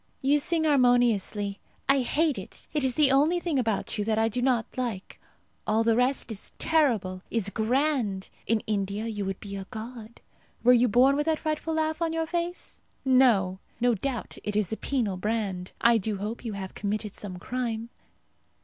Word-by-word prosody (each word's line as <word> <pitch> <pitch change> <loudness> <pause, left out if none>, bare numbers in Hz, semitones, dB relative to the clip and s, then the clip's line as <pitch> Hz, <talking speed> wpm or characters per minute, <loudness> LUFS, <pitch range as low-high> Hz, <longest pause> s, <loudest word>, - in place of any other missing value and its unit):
You 285 +2 +3
sing 325 +2 +1
harmoniously. 245 -8 +2 0.3
I 275 0 +5
hate 290 0 +1
it. 190 - -11
It 300 -2 0
is 255 -2 +2
the 295 -3 +5
only 300 +6 +4
thing 335 -6 0
about 220 -3 -1
you 205 - 0
that 220 0 +1
I 225 0 +3
do 245 +3 -2
not 245 -3 0
like. 235 -7 -4 0.5
All 220 +1 +3
the 225 0 +3
rest 250 0 +1
is 205 - -5
terrible 225 - +1
is 210 -4 -1
grand. 230 -4 0 0.2
In 225 -1 +2
India 205 0 -2
you 210 -3 -3
would 195 0 -3
be 200 -1 -7
a 195 -1 -6
god. 230 0 -8 0.4
Were 250 +1 +7
you 245 0 +5
born 255 +5 +5
with 295 +2 -1
that 320 -1 +2
frightful 310 +1 -2
laugh 315 +1 -1
on 330 -1 0
your 325 0 0
face? 345 +1 -4 0.2
No! 230 -8 +4 0.2
No 245 0 +3
doubt 240 +3 -4
it 210 - -3
is 210 0 +1
a - - -3
penal 230 -9 -1
brand. 195 -3 -2
I 235 -1 +5
do 210 0 -2
hope 210 +5 -5
you 225 -3 -4
have 190 -1 -6
committed 210 0 -3
some 190 -3 -7
crime. 230 +2 -3
230 Hz, 185 wpm, -27 LUFS, 205-275 Hz, 0.5 s, Were